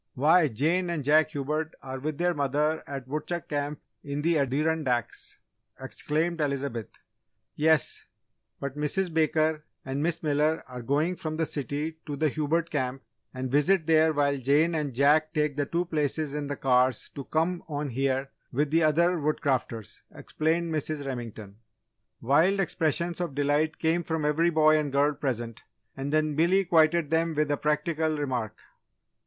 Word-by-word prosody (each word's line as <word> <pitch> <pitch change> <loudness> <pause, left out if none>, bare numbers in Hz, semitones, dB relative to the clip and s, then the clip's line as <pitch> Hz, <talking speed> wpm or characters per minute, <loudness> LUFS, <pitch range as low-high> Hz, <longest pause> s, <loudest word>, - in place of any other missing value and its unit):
"Why, 155 +5 +4
Jane 160 +9 0
and 165 -4 -2
Jack 155 +3 +4
Hubert 155 +2 -3
are 130 0 -6
with 150 +2 -4
their 175 0 +1
mother 150 +2 0
at 135 -2 -6
Woodchuck 155 +4 -4
Camp 145 0 -3 0.2
in 145 +1 -4
the 165 -1 +2
Adirondacks!" 140 -3 -1 0.4
exclaimed 155 +5 -2
Elizabeth. 140 -5 -2 0.7
"Yes, 155 -2 +2 0.5
but 140 -1 -5
Mrs. 160 +4 -1
Baker 155 -1 +1 0.2
and 135 +2 -3
Miss 165 +1 -1
Miller 150 +1 +1
are 125 -1 -7
going 150 +8 0
from 155 -1 -4
the 160 - +1
city 150 +2 -3
to 145 - -3
the 155 +2 +1
Hubert 160 +3 -1
Camp 130 -2 -2 0.3
and 130 0 -5
visit 155 +5 +3
there 160 0 +4
while 145 -2 +1
Jane 145 +6 +3
and 150 -5 -2
Jack 150 +4 +3
take 150 -2 +1
the 145 -1 -1
two 175 +1 -1
places 155 -2 -1
in 150 -1 -3
the 145 -1 -4
cars 125 -2 +2
to 140 - -7
come 170 +3 0
on 145 -2 -3
here 135 +2 -1 0.2
with 145 +3 0
the 165 +1 +3
other 170 +3 +3
Woodcrafters," 130 -7 -2
explained 165 +1 -1
Mrs. 155 -1 -2
Remington. 115 -6 -6 0.6
Wild 160 +11 +3
expressions 170 -1 0
of 170 -6 -3
delight 145 +2 +1
came 165 +2 +1
from 160 -3 -2
every 160 +3 +2
boy 155 -1 +4
and 145 -2 -2
girl 145 +2 +2
present 120 -5 -4 0.3
and 135 +1 -4
then 155 0 +1
Billy 180 +5 +3
quieted 165 -2 +3
them 165 0 +1
with 150 0 +1
a 145 - +1
practical 155 +1 0
remark. 125 -7 -3
150 Hz, 160 wpm, -27 LUFS, 140-160 Hz, 0.7 s, Why